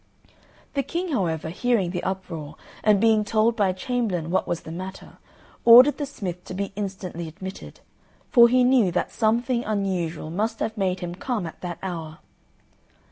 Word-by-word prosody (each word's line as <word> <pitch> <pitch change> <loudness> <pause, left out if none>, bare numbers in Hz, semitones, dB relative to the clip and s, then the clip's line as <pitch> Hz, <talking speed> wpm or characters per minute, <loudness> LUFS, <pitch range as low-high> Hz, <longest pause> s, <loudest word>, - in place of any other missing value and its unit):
The 280 - +1
King, 345 +6 -3
however, 165 - -1
hearing 195 0 0
the 180 -1 -3
uproar, 180 -6 -5 0.3
and 210 -2 +4
being 220 0 +4
told 220 +2 +2
by 205 -4 +2
a - - 0
chamberlain 190 -7 -2
what 190 - +1
was 170 - -2
the 160 - -9
matter, 185 +3 -8 0.4
ordered 250 +6 +8
the 290 - -2
smith 180 -9 -6
to 185 - -7
be 200 +1 -3
instantly 190 -4 -5
admitted, 190 +4 -9 0.5
for 235 -2 +8
he 250 +1 +4
knew 245 -7 +4
that 180 - -1
something 235 +2 +1
unusual 185 -7 -2
must 210 +6 -2
have 220 - -2
made 190 -3 -1
him 175 -1 -4
come 215 +1 -3
at 160 - -9
that 175 -2 -5
hour. 165 -4 -5
195 Hz, 170 wpm, -24 LUFS, 175-230 Hz, 0.5 s, ordered